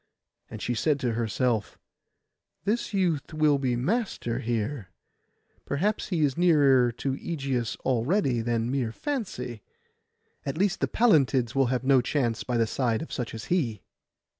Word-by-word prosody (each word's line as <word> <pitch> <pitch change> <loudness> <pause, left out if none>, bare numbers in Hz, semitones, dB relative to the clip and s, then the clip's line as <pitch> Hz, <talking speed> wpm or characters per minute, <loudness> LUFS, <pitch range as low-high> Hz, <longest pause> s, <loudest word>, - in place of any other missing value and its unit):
And - - -7
she 120 - 0
said 145 +4 +1
to 120 -3 0
herself, 115 -1 -1 0.9
'This 215 +5 -1
youth 175 -7 0
will 150 -2 +3
be 130 -3 0
master 155 - -1
here; 115 -1 -2 0.7
perhaps 200 +10 -1
he 175 -5 -1
is 140 -3 +1
nearer 140 -8 +4
to 135 +3 -2
Ægeus 135 -6 -3
already 130 - +1
than 115 +1 -1
mere 130 -5 -1
fancy. 125 - -4 0.8
At 140 +2 -4
least 195 +1 +1
the - - +1
Pallantilds 135 - +3
will 135 -2 +3
have 125 0 -1
no 135 -1 +5
chance 120 -3 -1
by 125 -1 -1
the 115 - +3
side 115 +1 0
of - - -9
such 120 -3 -4
as 110 - -7
he. 120 - -1
130 Hz, 150 wpm, -27 LUFS, 120-155 Hz, 0.9 s, no